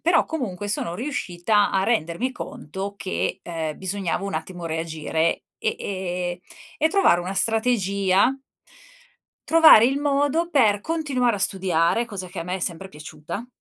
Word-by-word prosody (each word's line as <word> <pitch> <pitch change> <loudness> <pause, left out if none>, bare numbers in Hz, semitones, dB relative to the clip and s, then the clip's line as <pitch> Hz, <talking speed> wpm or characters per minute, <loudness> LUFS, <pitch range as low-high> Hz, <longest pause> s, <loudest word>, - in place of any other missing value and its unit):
però 335 0 +3
comunque 205 - -4
sono 170 -4 -2
riuscita 205 -4 0
a 190 - +1
rendermi 225 +3 0
conto 195 - -6
che, 90 - -3
ehm, 160 -3 -4
bisognava 190 0 -2
un 195 - -4
attimo 170 +2 -5
reagire 160 0 -1
e - - 0
e 180 -2 -3 0.4
e 315 - +3
trovare 330 - +4
una 180 +2 -4
strategia 200 -1 +2 1.1
trovare 320 -9 +8
il 270 +3 +2
modo 290 +3 +1
per 220 -11 +3
continuare 270 -8 0
a - - -6
studiare, 190 +3 +1
cosa 190 -5 -6
che 185 - -9
a - - -2
me 180 +1 -3
è 190 - -3
sempre 180 +2 -3
piaciuta. 160 +6 -8
195 Hz, 145 wpm, -23 LUFS, 175-245 Hz, 1.1 s, trovare